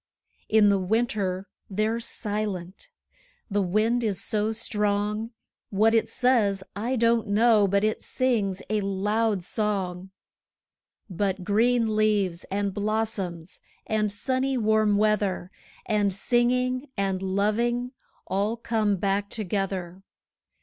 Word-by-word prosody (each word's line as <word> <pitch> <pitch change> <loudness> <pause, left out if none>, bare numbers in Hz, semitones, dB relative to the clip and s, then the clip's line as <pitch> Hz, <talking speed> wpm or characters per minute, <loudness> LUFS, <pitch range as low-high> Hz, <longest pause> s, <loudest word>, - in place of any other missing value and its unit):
In 215 -1 +5
the 200 -1 +3
winter 200 -2 -1 0.2
they're 215 +3 0
silent 205 - -4 0.6
the 205 +1 +2
wind 215 +6 +1
is 205 -5 +1
so 215 -1 +1
strong; 210 -1 -1 0.4
What 215 +3 +3
it 225 - +2
says, 220 -7 +2
I 235 +6 -1
don't 230 -1 +2
know, 215 0 +4
but 200 +1 +1
it 215 0 0
sings 215 -7 -1
a 215 -1 0
loud 205 +1 0
song. 190 -3 -2 1.0
But 190 0 -2
green 225 +2 +2
leaves, 205 -5 +1
and 200 0 -2
blossoms, 205 -5 -3 0.3
and 215 -1 0
sunny 260 +5 -1
warm 215 -2 +3
weather, 205 -3 +1 0.4
5 220 - 0
And 205 -1 +2
singing, 250 +5 +1
and 195 -1 -1
loving 220 +6 0 0.3
all 205 +4 -1
come 220 -3 0
back 200 +2 -1
together. 195 -3 -3
210 Hz, 115 wpm, -26 LUFS, 195-225 Hz, 1.0 s, In